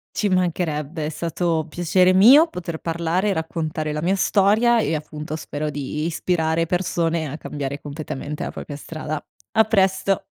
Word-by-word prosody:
Ci 210 Hz, -, +1 dB
mancherebbe, 165 Hz, -4 st, -1 dB
è -, -, -2 dB
stato 165 Hz, 0 st, -1 dB
piacere 180 Hz, +3 st, +3 dB
mio 255 Hz, -, +8 dB
poter 170 Hz, -, -6 dB
parlare 170 Hz, +4 st, -1 dB
e -, -, +2 dB
raccontare 155 Hz, -2 st, -3 dB
la 150 Hz, -, -3 dB
mia 185 Hz, +4 st, +2 dB
storia 215 Hz, +5 st, +3 dB
e 165 Hz, -, 0 dB
appunto 150 Hz, 0 st, -5 dB
spero 150 Hz, -1 st, -4 dB
di 145 Hz, +1 st, -4 dB
ispirare 165 Hz, -1 st, 0 dB
persone 170 Hz, -2 st, 0 dB
a 150 Hz, -, -5 dB
cambiare 140 Hz, -2 st, -5 dB
completamente 145 Hz, 0 st, -6 dB
a -, -, -3 dB
propria 145 Hz, -, -7 dB
strada. 155 Hz, 0 st, -5 dB, 0.3 s
A 220 Hz, -, +5 dB
presto. 195 Hz, -2 st, +2 dB
165 Hz, 155 wpm, -22 LUFS, 155-185 Hz, 0.3 s, mio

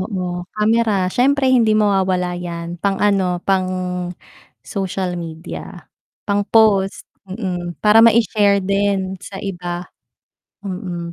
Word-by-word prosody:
Oo, 180 Hz, -2 st, -4 dB
kamera 220 Hz, +1 st, +2 dB, 0.2 s
siyempre 265 Hz, +1 st, +3 dB
hindi 225 Hz, -4 st, +4 dB
mawawala 190 Hz, -4 st, +1 dB
yan 170 Hz, -1 st, -6 dB
pang 195 Hz, 0 st, 0 dB
ano, 195 Hz, -3 st, +1 dB
pang 190 Hz, -1 st, +2 dB, 1.0 s
social 185 Hz, -3 st, -3 dB
media, 165 Hz, 0 st, -8 dB, 0.4 s
pang 205 Hz, -1 st, -1 dB
post, 205 Hz, -4 st, +3 dB, 0.2 s
mm, 180 Hz, -4 st, -4 dB
para 215 Hz, +1 st, +5 dB
maishare 210 Hz, -4 st, +4 dB
din 195 Hz, -1 st, 0 dB
sa 195 Hz, -, -9 dB
iba. 175 Hz, -2 st, -5 dB, 0.8 s
Mm. 180 Hz, -3 st, -5 dB
195 Hz, 110 wpm, -19 LUFS, 180-210 Hz, 1.0 s, para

